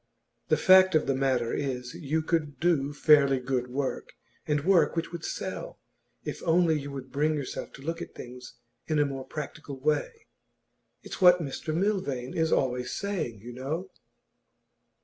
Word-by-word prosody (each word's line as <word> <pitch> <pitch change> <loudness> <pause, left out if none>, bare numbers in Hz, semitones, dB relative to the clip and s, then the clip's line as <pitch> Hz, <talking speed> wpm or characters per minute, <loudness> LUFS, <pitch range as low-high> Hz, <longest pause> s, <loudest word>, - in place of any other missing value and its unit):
The 155 - +3
fact 185 -1 +6
of 155 - +3
the 135 - +1
matter 130 -3 0
is, 125 -3 -3
you 155 +2 -2
could 150 -5 -1
do 150 -4 +2
fairly 145 -3 +5
good 125 -1 -1
work, 130 +2 -3 0.3
and 150 0 0
work 190 -3 +4
which 165 0 -2
would 170 -2 -7
sell, - - -5 0.4
if - - -5
only 165 -2 +3
you 140 0 -7
would 135 -2 -8
bring 155 +2 +1
yourself 140 -3 -5
to 135 - -12
look 165 +2 -3
at - - -8
things 125 +1 -10 0.3
in 155 - +1
a 145 - +4
more 135 -2 -5
practical 150 -2 -7
way. 155 - -1 0.8
It's - - -8
what 180 -1 +8
Mr 155 0 -4
Milvain 160 -8 -1
is 160 -1 +1
always 125 -1 0
saying, 180 - -3
you 120 +2 -9
know. 155 +9 -4
145 Hz, 165 wpm, -28 LUFS, 130-165 Hz, 0.8 s, what